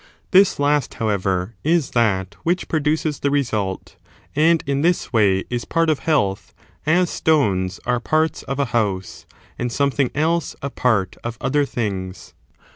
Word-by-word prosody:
This 190 0 +5
last, 145 -1 +1
how 115 -2 -1
ever, 95 0 -1
is 160 -3 +1
that 100 -5 +1
which 175 +2 -1
produces 155 -1 0
the 140 - 0
result, 110 -9 -2 0.4
and 160 +2 +3
in 140 0 0
this 175 -4 0
way 100 -4 +3
is 120 -1 -2
part 165 -1 +1
of 150 - -1
health, 100 -12 0 0.3
as 175 +3 +4
stones 95 - +1
are 125 0 +1
parts 155 +5 0
of 135 0 -5
a 140 - +1
house, 100 -5 -2 0.3
and 120 0 -2
something 140 0 +1
else 160 +2 0
a 140 - -3
part 105 -7 0
of 115 -1 -5
other 145 +2 +1
things. 95 -7 -4
135 Hz, 155 wpm, -21 LUFS, 100-155 Hz, 0.4 s, This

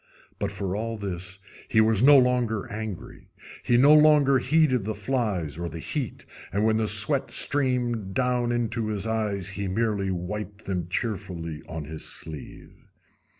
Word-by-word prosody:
But, - - -2
for 95 -1 -3
all 115 +1 -3
this, 95 -2 -5 0.3
he 110 - +2
was 110 -1 +4
no 140 +2 +8
longer 125 -4 +2
angry; 105 -3 -7 0.3
he 120 - +2
no 140 +4 +7
longer 150 -3 +6
heeded 130 -3 +2
the 110 +1 -3
flies 100 - -2
or 85 -1 -3
the 85 - -8
heat, 125 - -4 0.3
and 100 +4 0
when 110 0 +3
the 110 -1 0
sweat 110 +7 +2
streamed 120 -8 0
down 125 -2 +1
into 115 -2 -1
his 105 -1 -3
eyes 105 -4 -1
he 100 0 -4
merely 100 0 0
wiped 100 +3 -5
them 90 -4 -2
cheerfully 90 -6 -3
on 80 -1 -5
his 80 +2 -7
sleeve. 80 -3 -9
110 Hz, 155 wpm, -26 LUFS, 95-125 Hz, 0.3 s, no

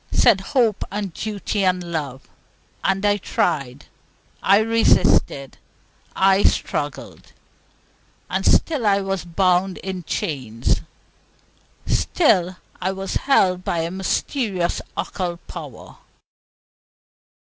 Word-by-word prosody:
said 215 -6 +4 0.2
hope 225 -5 +3
and 200 -3 -4
duty 205 0 -3
and 185 -1 +1
love; 140 -5 -4 0.6
and 195 +1 +1
I 205 0 +3
tried, 140 -8 -2 0.6
I 195 +1 +5
resisted, 220 -10 +2 0.6
I 195 +1 +4
struggled. - - -2 0.9
And - - -2
still 285 -9 +2
I 200 0 +3
was 195 -3 -2
bound 180 +1 +1
in 190 -1 -5
chains; 125 -8 -2 1.0
still 185 - +2 0.2
I 185 - 0
was 195 0 -5
held 185 -9 +2
by 170 -2 -1
a 165 +1 -3
mysterious 190 0 -1 0.2
occult 175 -2 -4
power. - - -10
190 Hz, 100 wpm, -21 LUFS, 170-205 Hz, 1.0 s, I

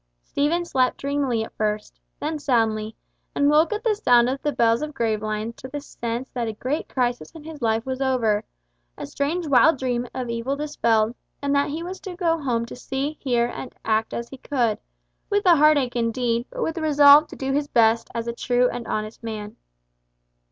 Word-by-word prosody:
Stephen 325 - 0
slept 260 -6 +1
dreamily 275 -5 -1
at - - -10
first, 210 0 -3 0.2
then 305 +1 -3
soundly, 220 -5 0 0.4
and 285 +1 +3
woke 310 +5 +4
at 425 +1 -3
the 455 -3 +3
sound 245 - +4
of 265 +2 -2
the 295 - 0
bells 230 -2 +2
of 300 -1 -5
Gravelines 215 -1 -2
to 260 - -8
the 290 +3 -5
sense 240 -3 -5
that 240 -2 -2
a 220 - -3
great 260 +8 -3
crisis 245 -2 -1
in 320 - -10
his 310 -2 -9
life 225 0 +1
was 260 0 -4
over, 230 -6 +1 0.5
a - - -5
strange 290 - -2
wild 285 +2 +5
dream 245 -1 -2
of 255 -1 -4
evil 235 +4 -2
dispelled, 230 -7 +1 0.3
and 280 0 -1
that 280 0 +2
he 315 +3 -4
was 370 +2 -6
to 370 -2 -8
go 335 -3 0
home 235 -4 0
to - - -9
see, 270 +4 -4
hear, 240 -3 +1
and 245 +2 -7
act 220 0 +1
as 235 - -4
he 270 - -9
could, 240 -7 0 0.5
with 410 -1 +1
a 345 -2 +7
heartache 285 -4 +4
indeed, 235 0 0
but - - -4
with 325 - -1
the 335 - -5
resolve 295 0 +7
to - - -10
do 270 0 -3
his 285 +1 0
best 230 -2 +3
as 230 0 -2
a 235 - -2
true 245 +1 +2
and 240 -1 -6
honest 215 +1 -4
man. 215 -2 -6
255 Hz, 200 wpm, -23 LUFS, 230-295 Hz, 0.5 s, a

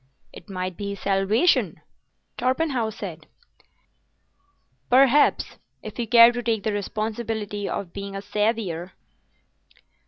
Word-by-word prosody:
"It - - -13
might 185 -2 -4
be 200 -1 -4
his - - -15
salvation," 200 - +2 0.6
Torpenhow 255 -2 0
said. 175 -7 -8 1.6
"Perhaps—if 255 -4 +2
you 235 - -2
care 235 +1 +8
to 245 0 -4
take 225 -3 -1
the 215 - -1
responsibility 215 0 -3
of 180 -4 -5
being 200 0 -6
a 195 - -4
saviour." 205 -5 -2
215 Hz, 105 wpm, -24 LUFS, 195-235 Hz, 1.6 s, care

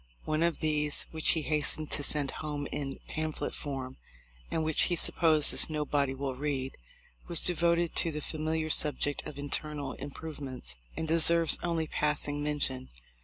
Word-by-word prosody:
One 155 +1 -1
of 170 0 0
these, 150 -1 0
which 160 -1 +2
he 160 - -3
hastened 155 0 +2
to - - +3
send 145 -1 +2
home 150 -2 -5
in 135 -2 -5
pamphlet 155 0 -4
form, 135 -2 -6 0.5
and 160 - -2
which 160 -1 +2
he 175 - 0
supposes 160 -3 +4
"nobody 145 -3 -1
will 135 0 -4
read," 135 -1 -4 0.5
was 170 - +7
devoted 170 -1 +1
to 165 - +4
the 150 - -5
familiar 155 +1 -3
subject 145 -1 +2
of 145 - -10
internal 145 -1 -4
improvements, 140 - -8 0.2
and 160 - -3
deserves 165 +1 +4
only 165 -2 -2
passing 150 -1 0
mention. 145 -3 -2
150 Hz, 150 wpm, -29 LUFS, 145-160 Hz, 0.5 s, was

